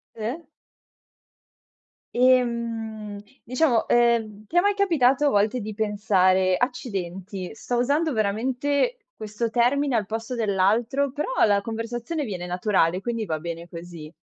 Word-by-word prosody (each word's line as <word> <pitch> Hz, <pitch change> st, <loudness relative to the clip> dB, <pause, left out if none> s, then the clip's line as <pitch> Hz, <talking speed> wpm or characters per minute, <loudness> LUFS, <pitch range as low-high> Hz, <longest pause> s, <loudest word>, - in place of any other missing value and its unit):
Sì. 230 Hz, +9 st, -4 dB, 1.7 s
Ehm, 230 Hz, -4 st, +1 dB, 0.2 s
diciamo, 250 Hz, -1 st, +1 dB
ehm, 230 Hz, -3 st, +2 dB
ti 340 Hz, -, -3 dB
è -, -, +9 dB
mai 405 Hz, +3 st, +3 dB
capitato 295 Hz, -8 st, +3 dB
a -, -, +5 dB
volte 215 Hz, +3 st, +1 dB
di 215 Hz, +1 st, -5 dB
pensare: 190 Hz, -3 st, +2 dB
"Accidenti, 195 Hz, -6 st, -4 dB
sto 245 Hz, +2 st, -3 dB
usando 290 Hz, +6 st, +1 dB
veramente 260 Hz, -, 0 dB, 0.2 s
questo 215 Hz, +2 st, -3 dB
termine 255 Hz, +3 st, +2 dB
al 215 Hz, -3 st, +1 dB
posto 225 Hz, +3 st, -4 dB
dell'altro, 225 Hz, +6 st, +1 dB
però 300 Hz, -, -3 dB, 0.2 s
la 205 Hz, -2 st, +3 dB
conversazione 235 Hz, +7 st, -4 dB
viene 180 Hz, -5 st, -5 dB
naturale, 180 Hz, -1 st, +1 dB
quindi 230 Hz, +1 st, -3 dB
va 160 Hz, -5 st, -2 dB
bene 170 Hz, +1 st, -6 dB
così?" 170 Hz, -2 st, -9 dB
225 Hz, 125 wpm, -24 LUFS, 200-250 Hz, 1.7 s, è